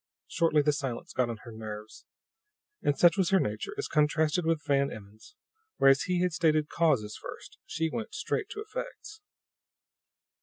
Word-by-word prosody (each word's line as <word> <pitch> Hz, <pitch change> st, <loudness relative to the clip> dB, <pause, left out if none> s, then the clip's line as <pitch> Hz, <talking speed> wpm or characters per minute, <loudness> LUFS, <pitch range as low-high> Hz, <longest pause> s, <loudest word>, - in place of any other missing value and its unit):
Shortly 160 Hz, -3 st, +2 dB
the 150 Hz, 0 st, +3 dB
silence 135 Hz, -5 st, -4 dB
got 125 Hz, -2 st, +1 dB
on 115 Hz, -, -4 dB
her 120 Hz, -, -10 dB
nerves; 110 Hz, -1 st, -8 dB, 0.8 s
and 145 Hz, -1 st, +1 dB
such 175 Hz, +4 st, +5 dB
was 190 Hz, -3 st, +2 dB
her 195 Hz, -, +4 dB
nature, 415 Hz, -, -3 dB
as 425 Hz, -, -2 dB
contrasted 155 Hz, +2 st, +2 dB
with 165 Hz, -3 st, +1 dB
Van 140 Hz, -1 st, +2 dB
Emmon's 110 Hz, -, -12 dB, 0.4 s
whereas 135 Hz, 0 st, +5 dB
he 180 Hz, -1 st, +2 dB
had 180 Hz, -2 st, 0 dB
stated 155 Hz, -3 st, +2 dB
causes 130 Hz, -11 st, +1 dB
first, -, -, -10 dB
she 160 Hz, +1 st, -1 dB
went 220 Hz, +7 st, -5 dB
straight 420 Hz, -2 st, -2 dB
to 425 Hz, -, -6 dB
effects. 435 Hz, -1 st, -7 dB
155 Hz, 160 wpm, -29 LUFS, 135-180 Hz, 0.8 s, such